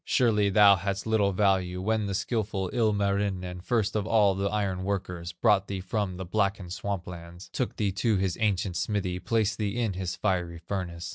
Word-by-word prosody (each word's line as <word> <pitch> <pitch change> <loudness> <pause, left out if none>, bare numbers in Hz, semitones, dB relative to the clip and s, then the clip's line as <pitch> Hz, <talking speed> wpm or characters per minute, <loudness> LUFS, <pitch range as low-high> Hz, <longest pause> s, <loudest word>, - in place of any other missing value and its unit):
Surely 105 -5 +2
thou 100 0 +7
hadst 100 +2 -3
little 110 -3 +2
value 95 -2 +1
When 110 +2 0
the 100 - -2
skilful 100 -4 -2
Ilmarinen, 100 -5 0
First 110 +1 0
of 105 -2 -1
all 105 -3 +4
the 100 +1 -1
iron 100 -3 -1
workers, 90 -3 -3
Brought 95 +3 +2
thee 100 -1 -3
from 95 0 -2
the 95 - -5
blackened 100 -1 -1
swamp 100 -2 -3
lands, 85 +1 -10
Took 125 - -2
thee 100 -3 0
to 105 +2 +1
his 95 -2 0
ancient 95 -4 0
smithy, 95 -2 -1
Placed 110 +1 0
thee 105 +2 -1
in 115 -5 0
his 90 -1 -3
fiery 90 -4 -1
furnace. 85 -1 -5
100 Hz, 185 wpm, -28 LUFS, 90-105 Hz, -, thou